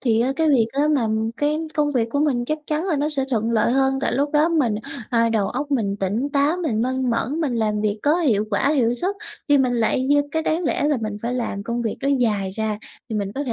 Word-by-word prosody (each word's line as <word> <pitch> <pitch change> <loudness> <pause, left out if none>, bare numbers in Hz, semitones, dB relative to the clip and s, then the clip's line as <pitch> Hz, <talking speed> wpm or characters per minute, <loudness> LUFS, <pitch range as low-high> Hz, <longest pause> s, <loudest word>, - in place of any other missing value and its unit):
thì 230 -3 +2
á 260 +3 +1
cái 320 -1 +2
việc 240 -6 +4
á 290 +2 +1
mà 240 -5 +1 0.3
cái 295 +1 0 0.2
công 295 -1 +1
việc 230 -3 +1
của 285 - 0
mình 255 -5 +1
chắc 310 +4 -2
chắn 305 +3 -1
là 325 -6 +1
nó 295 +2 0
sẽ 275 -3 0
thuận 225 -1 0
lợi 230 +1 +2
hơn, 270 0 +2
tại - - 0
lúc 285 +3 0
đó 300 +2 +4
mình 275 -10 +1 0.4
ờ, 230 -1 +3
đầu 215 -3 +1
óc 285 +3 -4
mình 205 -7 0
tỉnh 205 +8 -1
táo, 290 +4 +2
mình 250 -11 -1
minh 260 0 0
mẫn, 275 +7 -1
mình 275 -6 0
làm 215 -2 0
việc 210 0 -1
có 300 +3 +3
hiệu 220 - +2
quả, 215 +7 +1
hiệu 245 -5 +2
suất, 380 +10 -2 0.3
thì 290 -1 +5
mình 255 -2 +2
lại 235 +2 +1
như 290 +1 +4
cái 320 +1 -1
đáng 325 +3 0
lẽ 290 - 0
là 290 - +2
mình 215 -2 -3
phải 245 +2 -2
làm 215 -5 -3
công 235 +2 -3
việc 225 - -2
đó 275 - -1
dài 205 -5 0
ra 215 +1 -2 0.3
thì 220 - -3
mình 200 -1 -2
có 285 +2 -2
thể 240 - -2
255 Hz, 265 wpm, -22 LUFS, 225-290 Hz, 0.4 s, thì